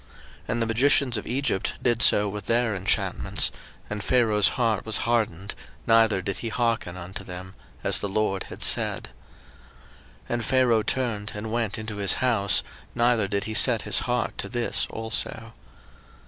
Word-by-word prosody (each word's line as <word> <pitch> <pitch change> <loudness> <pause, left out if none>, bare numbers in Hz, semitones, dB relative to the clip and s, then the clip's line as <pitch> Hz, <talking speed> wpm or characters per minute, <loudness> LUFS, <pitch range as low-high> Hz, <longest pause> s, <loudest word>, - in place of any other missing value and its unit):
02:007:022 - - -27 0.4
And 120 - -1
the - - +2
magicians 125 +2 +2
of 105 - -6
Egypt 130 -6 -1
did 120 -1 +1
so 105 -1 +5
with 100 -1 -6
their 115 -1 +2
enchantments: 95 0 0 0.4
and 105 0 -5
Pharaoh's 110 -5 +3
heart 115 -5 +1
was 110 -1 +1
hardened, 105 -5 -1 0.3
neither 110 -4 +3
did 100 -1 -2
he 115 - -5
hearken 115 -6 -1
unto 90 +1 -8
them; 90 +1 -9 0.3
as - - +1
the 100 - -3
LORD 95 -1 -1
had - - -7
said. - - +2 1.1
02:007:023 - - -27
And 120 -2 -2
Pharaoh 125 -4 +3
turned 110 -2 -2
and 110 +1 -5
went 115 -2 -1
into 110 -1 -6
his 100 -1 +3
house, 110 -7 +2 0.3
neither 120 -3 +2
did 100 0 -1
he 110 - -5
set 115 -1 +5
his 105 - +3
heart 125 -1 -2
to - - -3
this 120 -1 0
also. 115 0 -5
110 Hz, 165 wpm, -25 LUFS, 100-120 Hz, 1.1 s, so